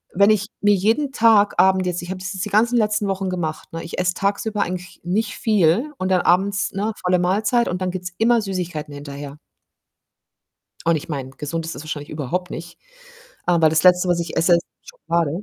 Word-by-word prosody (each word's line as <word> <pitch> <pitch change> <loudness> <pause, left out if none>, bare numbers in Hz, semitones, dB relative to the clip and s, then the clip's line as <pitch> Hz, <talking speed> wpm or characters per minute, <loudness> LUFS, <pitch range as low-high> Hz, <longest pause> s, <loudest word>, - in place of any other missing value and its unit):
wenn 200 +2 +5
ich 210 -1 +1 0.2
mir 205 0 +4
jeden 225 +9 +1
Tag 220 -4 +4
Abend 190 0 +4
jetzt 175 0 -2
ich 175 - -8
habe 190 - -5
das 190 +2 -5
jetzt 190 0 -3
die 210 - -5
ganzen 235 +4 +3
letzten 210 -2 +1
Wochen 195 -1 -2
gemacht, 160 -4 -4
ne? 165 - -5
Ich 170 - -7
esse 180 0 +1
tagsüber 205 +3 -1
eigentlich 180 0 -7
nicht 205 +4 -1
viel 215 - +2
und 185 0 -2
dann 185 -1 +3
abends, 195 +3 +2
ne, 210 +3 -2
volle 180 0 +3
Mahlzeit 210 +7 +1
und 180 +1 -3
dann 185 - 0
gibt's 180 -1 -5
immer 235 +1 +4
Süßigkeiten 180 -7 -4
hinterher. 145 0 -8 1.5
Und 165 0 +3
ich 155 - -5
meine, 135 -3 -4
gesund 160 +4 -4
ist 165 - -5
es 135 - -8
wahrscheinlich 150 -2 -6
überhaupt 165 +5 -3
nicht. 170 +1 -8 0.7
Aber 170 -3 +4
das 155 0 +2
Letzte, 180 0 +5
was 175 -1 +2
ich 170 -1 -5
esse, 175 +2 +4
ist 170 - +2 0.3
Schokolade. 170 - -2
180 Hz, 200 wpm, -21 LUFS, 165-205 Hz, 1.5 s, wenn